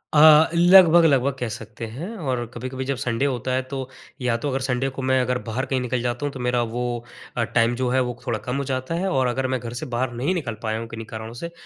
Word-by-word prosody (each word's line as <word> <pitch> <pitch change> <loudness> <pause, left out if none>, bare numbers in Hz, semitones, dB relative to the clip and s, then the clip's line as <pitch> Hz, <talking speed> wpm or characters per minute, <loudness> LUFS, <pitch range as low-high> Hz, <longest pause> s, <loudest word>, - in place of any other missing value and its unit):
अ, 155 +1 +8
लगभग-लगभग 170 -6 +6
कह 120 - -1
सकते 110 +2 -7
हैं 165 - -5 0.2
और 120 -1 -1
कभी-कभी 130 +2 -5
जब 140 - -1
संडे 120 +2 0
होता 130 -2 -1
है 130 - +1
तो 140 - -4 0.4
या 125 -2 +1
तो 145 +4 -3
अगर 135 0 -1
संडे 130 +1 0
को - - -2
मैं 130 0 +2
अगर 125 0 0
बाहर 125 +4 -2
कहीं 130 -1 -1
निकल 125 0 -1
जाता 120 +3 -2
हूँ 145 - -1
तो 135 - -8
मेरा 125 -1 +1
वो 125 - -2 0.5
अ, 115 - +2
टाइम 115 +1 +2
जो 125 0 -1
है 130 +1 +2
वो 120 - -5
थोड़ा 115 -3 -1
कम 125 +4 -4
हो 140 - -1
जाता 130 +5 -2
है 185 +3 -1
और 130 -7 +2
अगर 130 +2 -1
मैं 130 - 0
घर 115 0 -7
से - - -5
बाहर 125 0 0
नहीं 130 +9 0
निकल 125 -10 -3
पाया 110 0 -1
हूँ 115 - -6
किन्हीं 115 -1 -7
कारणों 110 +1 -7
से, 170 +8 -6
130 Hz, 255 wpm, -23 LUFS, 120-140 Hz, 0.5 s, अ